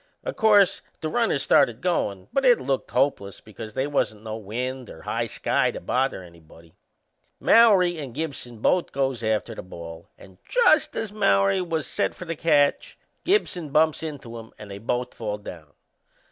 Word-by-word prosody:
O' - - -3
course 205 -3 +4 0.2
the 155 - -3
runners 225 - 0
started 115 -1 +3
goin', 100 - -1
but 275 - +1
it 245 -3 +5
looked 135 0 -2
hopeless 125 -7 0
because 110 +1 -10
they 130 - 0
wasn't 110 -7 -1
no 110 -1 -5
wind 125 +4 -5
or 80 - -12
high - - -2
sky - - 0
to - - -6
bother 130 -6 -1
anybody. 85 -1 -17 0.7
Mowrey 190 -7 +5
and 140 -4 -6
Gibson 135 -7 -6
both 180 +7 +2
goes 135 -3 -1
after 110 +1 -1
the - - -7
ball; 85 -2 -10
and 95 -2 -17
just 465 -11 +3
as 220 -2 -3
Mowrey 100 - +3
was 165 -4 -2
set - - -1
for 180 - -8
the 165 -1 -4
catch 145 -3 +1 0.3
Gibson 185 - 0
bumps 155 +1 +2
into 135 -7 -7
him 115 0 -12
and 105 -2 -10
they 100 - -7
both 125 +3 -2
fall 105 -2 -4
down. 85 -7 -11
130 Hz, 175 wpm, -24 LUFS, 105-165 Hz, 0.7 s, it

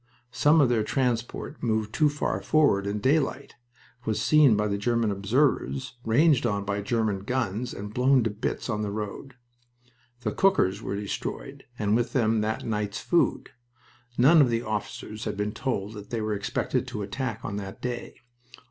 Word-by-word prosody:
Some 150 +5 +4
of 135 - +4
their 120 -3 +2
transport 125 +4 -2
moved 110 -2 -1
too 155 -1 +3
far 145 0 -2
forward 145 -11 +3
in 100 +1 -1
daylight, 135 +3 0 0.5
was 110 -3 -1
seen 135 +1 +5
by 105 0 +1
German 115 +1 +1
observers, 130 +5 0
ranged 140 +5 +4
on 100 -4 -1
by 100 0 -2
German 110 -2 0
guns, 120 +1 -2
and 105 +1 -7
blown 130 +1 +4
to 110 - 0
bits 105 +1 -3
on 105 -2 -2
the 105 - -2
road. 105 +6 -6 0.9
The - - -1
cookers 110 - +2
were 100 - -3
destroyed, 100 0 -5
and 105 -1 +1
with 120 0 0
them 115 -4 +2
that 110 +1 -2
night's 105 -1 -2
food. 175 - +1 0.7
None 150 +6 +7
of 135 - +4
the 115 0 0
officers 110 0 -5
had 105 -2 -3
been 105 +1 -1
told 110 -3 -3
that 105 -2 -10
they 115 - -2
were 110 -1 -1
expected 120 +5 -2
to 120 -5 -4
attack 115 +2 -4
on 100 - -3
that 95 -1 -7
day. 120 -1 -5
110 Hz, 170 wpm, -26 LUFS, 105-130 Hz, 0.9 s, None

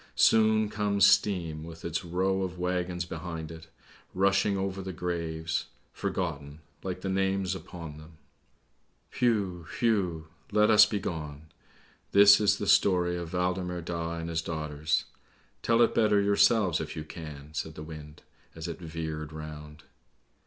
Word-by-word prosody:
Soon 110 -1 +4
comes 105 -1 +2
Steam 85 -6 +2
with 80 0 -10
its 85 0 -2
row 95 +2 0
of 90 -1 -4
waggons 90 -1 -2
behind 80 -1 -6
it, 80 0 -11 0.5
rushing 100 +1 +2
over 95 0 -2
the 95 0 -5
graves, 85 -2 -3 0.3
forgotten, 75 -4 -4 0.2
like 90 -1 -5
the 95 - -4
names 95 0 0
upon 85 -5 -8
them. 80 +1 -15 1.0
Whew! 100 -8 +1
whew! 95 -9 +1 0.3
Let 105 +1 +4
us 105 0 +8
be 105 -1 -2
gone! 80 -4 -6 0.6
This 100 0 +8
is 100 -1 +3
the 105 - -3
story 90 -3 +3
of 85 -1 -6
Waldemar 90 0 -1
Daa 85 0 -3
and 85 0 -5
his 80 0 -1
daughters. 75 -2 -2 0.6
Tell 115 +1 +4
it - - +2
better 105 -2 +3
yourselves, 100 -2 +3
if - - -6
you 80 - -4
can," 75 -2 -9
said 80 0 -4
the 75 - -7
wind, 75 -1 -10 0.3
as 80 0 -6
it 85 0 -6
veered 80 -2 -5
round. 75 -1 -9
90 Hz, 145 wpm, -29 LUFS, 80-95 Hz, 1.0 s, us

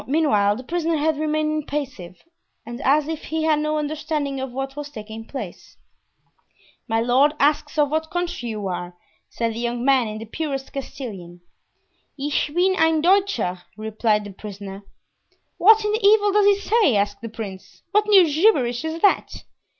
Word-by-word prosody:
Meanwhile 230 -9 +2
the 250 - -8
prisoner 335 +2 -1
had 305 0 0
remained 310 0 0
impassive 265 - -6 0.4
and 235 +3 -7
as 285 +2 +3
if 320 -1 -5
he 320 0 -2
had 310 -1 +2
no 305 0 -1
understanding 300 -2 -2
of 265 -1 -4
what 270 +2 -5
was 290 0 -6
taking 220 -3 -9
place. 275 - -8 1.1
"My 225 -1 +1
lord 255 +6 +3
asks 295 +1 +1
of 295 -1 +2
what 315 +1 -1
country 350 -9 -3
you 210 -2 -4
are," 175 -1 -5 0.3
said 230 -1 -2
the 225 - -6
young 240 +1 -2
man, 265 -4 +3
in 215 0 -5
the 225 - -7
purest 275 +2 -5
Castilian. 195 -11 -7 0.8
"Ich 290 +1 -1
bin 365 +4 +2
ein 320 -2 +3
Deutscher," 340 - +1 0.2
replied 215 0 0
the 205 - -8
prisoner. 200 -1 -9 0.8
"What 440 +3 +6
in 420 - +1
the 435 - 0
devil 410 -1 +4
does 410 0 +4
he 405 -1 +4
say?" 420 - +2
asked 205 0 0
the 230 - -6
prince. 210 -4 -9
"What 420 0 +2
new 395 -4 +7
gibberish 290 - +2
is 320 +1 -4
that?" 400 - +2
280 Hz, 170 wpm, -22 LUFS, 225-320 Hz, 1.1 s, new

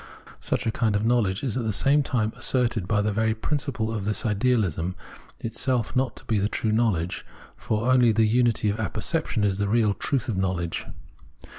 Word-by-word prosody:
Such - - -1
a 115 - +1
kind 110 -2 0
of 105 +2 0
knowledge 115 -4 +1
is 130 -3 -1
at 125 - -1
the 110 - 0
same 140 +8 +3
time 110 -5 -1
asserted 120 -5 0
by 105 -1 +1
the 105 - 0
very 110 +1 +1
principle 130 -3 -2
of 105 -3 -3
this 105 0 0
ideahsm 100 -6 0 0.4
itself 115 +1 -1
not 130 0 0
to - - -12
be 110 -3 +1
true 110 0 -1
knowledge; 105 -7 0 0.3
for 115 +3 -1
only 125 -2 +5
the 110 0 +3
unity 115 -1 +2
of 105 - -5
apperception 110 - -1
is 100 -1 +1
the 100 - 0
real 110 -2 +3
truth 130 +5 -1
of 110 - -2
knowledge. 90 -3 -2
110 Hz, 185 wpm, -25 LUFS, 105-120 Hz, 0.4 s, only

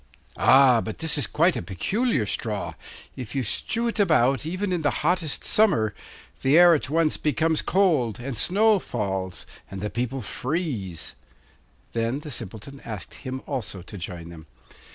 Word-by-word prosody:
'Ah! 130 -3 +6
but 110 - -5
this 160 -1 +1
is 145 - 0
quite 165 +3 +2
a - - -2
peculiar 185 - 0
straw. 105 0 -3 0.4
If 125 0 -7
you 135 - 0
strew 230 - -1
it 230 - -2
about 145 - +3
even 185 +3 -2
in 175 - 0
the 145 - +2 0.2
hottest 170 -3 +1
summer 135 - +3 0.5
the 135 +4 +4
air 175 0 +8
at 145 -4 -1
once 160 0 +2
becomes 160 +1 +1
cold, 155 - +2
and 125 +1 -5
snow 205 - +3
falls, 95 - -3 0.2
and 95 - -7
the 105 +2 -3
people 125 +1 -3
freeze.' 125 - -3 0.8
Then 115 +5 -1
the 150 - -7
Simpleton 115 +4 -6
asked 105 -6 -7
him 130 -1 -6
also 110 -9 -4
to 95 - -10
join 85 -2 -7
them. 80 -2 -12
135 Hz, 160 wpm, -25 LUFS, 105-165 Hz, 0.8 s, air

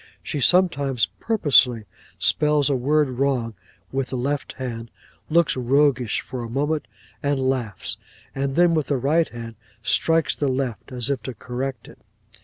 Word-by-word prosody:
She 145 - -3
sometimes 140 -6 +3
purposely 135 - +3 0.3
spells 150 -1 +3
a - - +2
word 145 +4 +2
wrong 130 -3 -1 0.4
with 135 -1 -1
the 130 - -4
left 140 +3 -2
hand, 115 -3 -6 0.4
looks 170 0 +3
roguish 130 -2 +2
for 125 - -6
a 115 - -6
moment 145 +5 -1 0.3
and 140 -2 0
laughs, 130 -6 -2 0.4
and 135 0 -2
then 175 0 +4
with 155 -3 0
the 140 - +1
right 155 +6 +2
hand 115 -2 -8 0.3
strikes 165 +4 +2
the 145 - -1
left, 130 -1 -2
as 125 +2 0
if 135 - -2
to 130 - -6
correct 125 +2 -5
it. - - -15
135 Hz, 155 wpm, -23 LUFS, 125-150 Hz, 0.4 s, then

